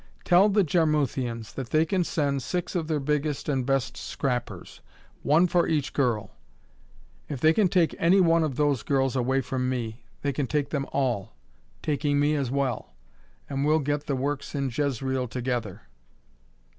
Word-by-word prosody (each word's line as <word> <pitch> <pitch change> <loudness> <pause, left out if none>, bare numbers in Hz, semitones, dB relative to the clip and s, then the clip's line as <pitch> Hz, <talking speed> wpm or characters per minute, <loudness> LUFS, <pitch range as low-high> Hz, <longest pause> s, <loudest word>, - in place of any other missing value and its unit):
Tell 185 +3 +5
the 205 0 +3
Jarmuthians 140 - 0
that 130 -3 -6
they 155 +1 +3
can 185 +1 +1
send 140 -4 -1
six 180 +5 -3
of 170 -4 -1
their 155 -2 0
biggest 150 0 -1
and 135 -4 0
best 135 -2 0
scrappers, 125 -3 -4 0.4
one 155 +5 +4
for 175 -1 +2
each 150 -4 -1
girl. 115 -7 0 1.0
If 140 - -4
they 155 +4 +5
can 205 +2 +3
take 175 -3 +2
any 180 +4 +4
one 165 -2 +4
of 150 -5 -2
those 145 -4 +1
girls 135 0 0
away 130 +1 +1
from 130 0 -2
me, 120 -2 -4 0.2
they 145 - +1
take 145 +1 -1
them 140 -2 -2
all 125 -8 -1 0.5
taking 145 -1 0
me 145 +1 +3
as 140 -4 -1
well 130 - -2 0.5
and 135 -1 -2
we'll 150 +2 +3
all - - +3
get 145 0 -2
the 140 - 0
works 140 +2 -3
in 135 -2 -1
Jezreel 130 -2 -1
together. 120 -4 -3
140 Hz, 170 wpm, -26 LUFS, 130-155 Hz, 1.0 s, Tell